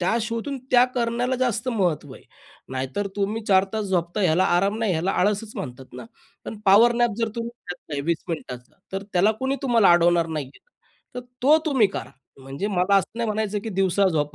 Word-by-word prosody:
त्या 180 +5 +1
शोधून 230 +5 -3
त्या 245 0 +6
करण्याला 245 +1 0
जास्त 245 -1 -1
महत्व 175 - -1
आहे. - - -15 0.5
नाहीतर 130 +10 -3
तुम्ही 210 +3 -1
4 190 -2 +4
तास 220 -1 -2
झोपताय 185 +1 -1
ह्याला 170 +3 +3
आराम 200 +4 +1
नाही. 220 -4 0
ह्याला 170 +3 0
आळसच 210 +3 0
म्हणतात 130 -1 -8
ना. 125 -1 -8 0.4
पण 220 - -7
पॉवर 215 +5 +6
नॅप 240 -2 +1
जर 230 -1 0
तुम्ही 230 0 -3 0.2
घेतलाय 150 -4 -6
20 170 -1 -1
मिनिटाचा 125 -7 -7 0.2
तर 195 +1 -3
त्याला 185 +4 +4
कोणी 265 +1 0
तुम्हाला 235 -7 +4
अडवणार 175 -1 +3
नाही 155 -4 -4
आहे. - - -19 0.5
तर 250 - -4 0.2
तो 295 +4 +6
तुम्ही 265 -8 +4
करा. 195 - -7 0.3
म्हणजे 135 +9 -5
मला 195 0 +2
असं 195 +4 -1
नाही 235 - 0
म्हणायचं 215 -1 -1
की - - -3
दिवसा 195 -1 +2
झोपा. 150 -4 -1
200 Hz, 190 wpm, -23 LUFS, 170-230 Hz, 0.5 s, त्या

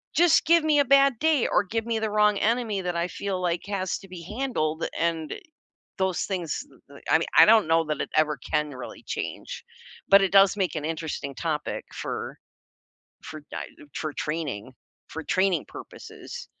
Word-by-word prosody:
Just 345 0 +5
give 335 0 +5
me 300 -2 +3
a 285 - +4
bad 275 -2 +4
day 315 -5 +3
or 205 - +3
give 225 +3 -2
me 230 -1 -1
the 220 -1 -1
wrong 210 -1 +3
enemy 225 -2 0
that 180 -2 -3
I 170 +1 -1
feel 195 -2 -3
like 175 -1 -1
has 190 -2 -2
to 195 - -14
be 180 -2 -9
handled, 170 -7 -2
and 165 -2 -1 0.7
those 190 -2 0
things, 180 -6 -3
th - - -22
th 140 - -14
I 160 - +6
mean, 165 - -2
I - - +10
don't 220 -4 +6
know 165 0 +3
that 150 -2 -2
it - - -3
ever 155 -1 +2 0.2
can 150 -1 +1
really 130 -2 -9
change, - - -5 0.4
but 195 0 +7
it 195 - +2
does 195 0 +6
make 180 -5 -1
an 150 - -4
interesting 155 -3 -4
topic 155 -3 -3
for - - -5 0.9
for 155 -1 -8
di- - - -4 0.3
for 155 -1 -3
training 145 -7 -4 0.3
for 160 - -6
training 185 -3 +1
purposes. - - -10
185 Hz, 185 wpm, -26 LUFS, 155-215 Hz, 0.9 s, I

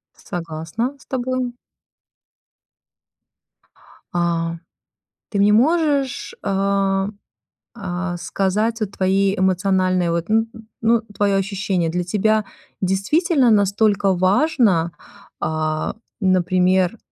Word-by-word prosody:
Согласна 170 - -4
с - - -19
тобой. 255 -1 -2 2.6
А, 170 -1 0 0.7
ты 205 - -2
мне 205 +1 +5
можешь, 285 +2 +1
э, 195 0 +1 0.7
э, 180 0 -3
сказать 205 +6 -1
вот 210 -3 -1
твои 195 +1 +1
эмоциональные, 185 -1 +1
вот, 170 +3 -2
н 225 +1 +2
н 225 -2 -13
ну, 230 0 +3
твоё 200 -1 +2
ощущение. 195 -3 -1
Для 180 +2 -2
тебя 215 +4 +1 0.4
действительно 250 - +2
настолько 200 -1 +3
важно, 190 - +2 0.5
а, 155 0 -1 0.3
например, 185 +1 +2
195 Hz, 90 wpm, -21 LUFS, 180-225 Hz, 2.6 s, мне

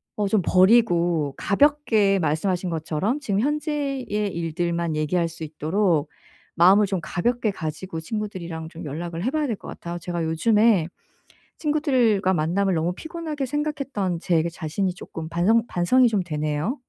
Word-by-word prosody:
어 205 -1 0
좀 200 -1 +2
버리고 175 - +3
가볍게 220 -5 +3
말씀하신 175 +4 0
것처럼 165 - -1
지금 205 -8 -1
현재의 290 -2 -1
일들만 170 -4 -2
얘기할 165 +3 0
수 165 0 -9
있도록 160 +1 0 0.5
마음을 190 +5 +6
좀 190 -2 -2
가볍게 225 +7 -1
가지고 160 +1 -5
친구들이랑 170 -5 -5
좀 170 0 -9
연락을 165 +4 -5
해 250 - +1
봐야 305 -1 0
될 230 - -1
것 - - -12
같아요. 170 0 -6
제가 170 -1 -3
요즘에 205 +2 +3 0.7
친구들과 255 - +2
만남을 180 +4 +1
너무 165 +2 0
피곤하게 315 - -5
생각했던 275 - -2
제 165 -3 +1
자신이 175 +3 -2
쪼끔 165 -2 -8
반성 215 +7 +2
반성이 245 +9 +3
좀 205 -5 0
되네요? 155 - -2
185 Hz, 335 characters per minute, -24 LUFS, 165-230 Hz, 0.7 s, 마음을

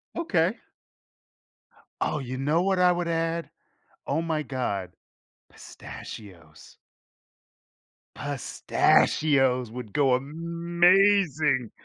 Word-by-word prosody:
Okay. 190 - +1 1.5
Oh, - - 0
you 130 -1 -5
know 150 +5 +1
what 190 -1 +1
I 180 0 +5
would 175 -1 -2
add? 165 0 -2 0.5
Oh 155 +4 -1
my 160 -2 -2
god. 115 -10 -4 0.6
Pistachios. 85 -7 -12 1.4
Pistachios 135 -2 +1
would 120 -3 -8
go 135 -3 +2
amazing. 170 - +2
150 Hz, 80 wpm, -26 LUFS, 130-170 Hz, 1.5 s, I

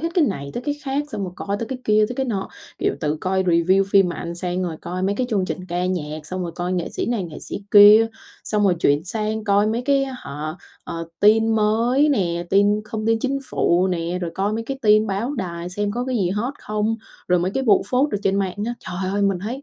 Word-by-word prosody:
hết 330 - -1
cái 340 -4 +4
này 140 - -3
tới 240 - -3
cái 290 +2 -1
khác, 275 +1 0
xong 205 - -4
rồi 180 - -6
coi 200 0 -3
tới 230 - -3
cái 260 -1 -4
kia 215 0 +4
tới 250 - -5
cái 265 - -1
nọ, 200 -5 -2 0.3
kiểu - - 0
từ 150 -1 0
coi 190 0 0
review 185 +2 +3
phim 195 -2 +5
mà 175 - -4
ăn 170 0 -5
sang 180 +1 -2
rồi 170 -3 -3
coi 180 +2 -4
mấy 195 +2 +1
cái 250 +4 -1
chương 200 -4 +1
trình 185 0 -5
ca 175 +1 -1
nhạc, 155 -4 -4
xong 185 +2 -4
rồi 170 -1 -4
coi 180 +1 -2
nghệ 175 -2 -1
sĩ - - -3
này 230 -6 -1
nghệ 160 -3 -8
sĩ 200 - -6
kia, 210 +2 +9 0.4
xong 210 -1 +1
rồi 185 -3 +4
chuyển 145 0 +2
sang 215 +2 -2
coi 205 0 +3
mấy 225 +3 -1
cái, 275 +1 +2
á 270 - -6
hả, 150 - -6 0.3
ờ, 165 0 -5
tin 220 +2 +5
mới 230 +7 +3
nè, 175 - 0
tin 205 +2 +3
không 215 0 -4
tin 225 0 +3
chính 270 +4 -1
phủ 180 +2 +2
nè, 175 0 -2
rồi 175 -2 -3
coi 200 +2 0
mấy 225 +1 -2
cái 270 +3 -5
tin 215 0 +5
báo 215 +8 -2
đài 170 -5 -4
xem 205 +2 -2
có 245 +3 -2
cái 255 -1 -1
gì 185 -5 +1
hot 230 +8 -2
không? 215 +1 -1 0.3
Rồi 180 - +4
mấy 175 +2 0
cái 265 +6 -2
vụ 210 -5 +4
phốt 265 +4 +2
ở 205 - 0
trên 195 0 +1
mạng 190 -2 -2
á. 240 - -2
Trời 185 +1 -4
ơi! 205 - 0
Mình 195 -2 +2
thấy, 235 +9 -5
200 Hz, 260 wpm, -22 LUFS, 180-225 Hz, 0.4 s, kia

